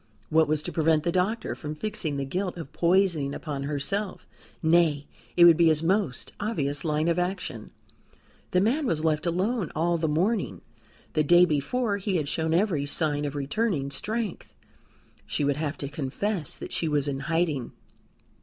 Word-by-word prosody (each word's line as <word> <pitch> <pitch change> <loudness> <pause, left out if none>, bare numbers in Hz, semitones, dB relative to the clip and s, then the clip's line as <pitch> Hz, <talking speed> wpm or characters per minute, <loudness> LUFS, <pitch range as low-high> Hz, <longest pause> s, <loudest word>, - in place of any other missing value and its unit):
What 160 0 +4
was 150 0 0
to - - -4
prevent 160 -1 +2
the 170 - +1
doctor 190 +6 0
from 150 0 -6
fixing 155 -5 -3
the 140 - -2
guilt 180 +6 -3
of 155 -3 -8
poisoning 170 -4 +2
upon 145 -4 -5
herself? 180 +8 -2 0.4
Nay; 160 -3 +3 0.3
it 170 - +9
would 170 -2 +8
be 170 -1 +5
his 155 0 +3
most 180 - 0
obvious 145 -10 -1
line 155 0 0
of 170 +1 +2
action. 180 +2 -3 0.8
The 180 - +2
man 265 +8 +1
was 160 -4 0
left 155 0 +1
alone 190 +3 0
all 170 +2 +1
the 160 - 0
morning; 185 +8 0 0.5
the 155 - +2
day 175 +4 +6
before 200 - 0
he 195 -1 -2
had 155 -4 0
shown 160 +2 -1
every 165 -5 +1
sign 145 -1 +1
of 145 0 -4
returning 145 0 -1
strength; 215 +6 -4 0.7
she - - -1
would 140 0 +1
have 155 -1 -2
to 140 - -4
confess 155 +5 -3
that - - -8
she 165 - -1
was 145 -2 +1
in 135 -1 -2
hiding. 160 -4 -1
160 Hz, 175 wpm, -27 LUFS, 150-185 Hz, 0.8 s, it